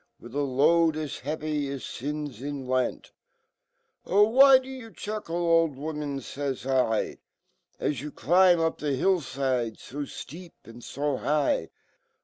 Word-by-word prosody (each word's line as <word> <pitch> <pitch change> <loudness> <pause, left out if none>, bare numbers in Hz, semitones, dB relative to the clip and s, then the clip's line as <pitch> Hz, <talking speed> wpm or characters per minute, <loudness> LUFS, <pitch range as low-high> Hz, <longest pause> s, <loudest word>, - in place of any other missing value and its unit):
With 120 0 -12
a 145 - 0
load 155 +4 +3
as 155 -3 -4
heavy 150 0 -3
as 140 -1 -5
fins 145 -2 -5
in 140 -1 -5
lent. 130 0 -1 1.0
'Ohlwhy 260 +7 +6
do - - -13
you 260 -4 -8
chuckle^old 170 -8 0
woman^faysl, 135 -4 -2 0.6
As 140 -4 -1
you 150 +1 -6
climb 175 +3 +4
up 165 0 0
the 145 -2 -1
hill 185 +8 +2
fide 130 -5 -2
fo 140 - -11
fteep 160 +4 -7
and 115 +1 -12
fo 145 -1 -2
high? 145 - 0
145 Hz, 125 wpm, -27 LUFS, 135-165 Hz, 1.0 s, Ohlwhy